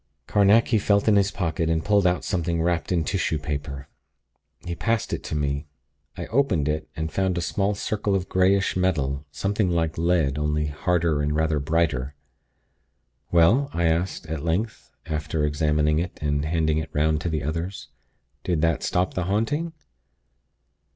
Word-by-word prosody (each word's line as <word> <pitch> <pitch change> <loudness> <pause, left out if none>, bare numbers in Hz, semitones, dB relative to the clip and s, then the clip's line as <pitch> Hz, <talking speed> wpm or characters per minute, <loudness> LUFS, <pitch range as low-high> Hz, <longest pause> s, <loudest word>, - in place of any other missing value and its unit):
Carnacki 105 +3 +4
felt 100 0 +2
in 110 - +5
his 100 -1 +3
pocket, 85 -4 -1
and 80 -1 0
pulled 100 -3 +4
out 90 0 0
something 85 -1 -1
wrapped 85 +1 0
in 85 -3 +2
tissue 80 +1 0
paper. 70 -2 -5 0.8
He 85 - -3
passed 115 +5 -1
it - - -2
to - - -3
me. 70 0 -2 0.5
I - - -4
opened 110 - +1
it, 75 +1 -2
and 80 0 -3
found 95 +1 0
a - - 0
small 100 +3 0
circle 100 0 -1
of 95 -1 -1
greyish 95 +1 +2
metal, 75 -6 0
something 100 +5 -1
like 80 -2 0
lead, 80 -5 +1
only 75 0 0
harder 80 0 0
and 75 +1 0
rather 80 -1 +1
brighter. 75 -3 0 1.2
"Well?" 105 +12 +4
I 85 - 0
asked, 85 +3 0
at 80 -2 -4
length, 95 +7 -2
after 75 -1 -1
examining 75 +1 +1
it 85 +1 -4
and 75 -1 -1
handing 80 -1 +1
it 80 - -5
'round 75 +1 +1
to 85 - -2
the 80 -3 -2
others. 85 +6 -4 0.5
"Did 85 -4 0
that 80 -2 +1
stop 90 +1 0
the 90 - -2
haunting?" 130 - 0
80 Hz, 165 wpm, -24 LUFS, 75-95 Hz, 1.2 s, in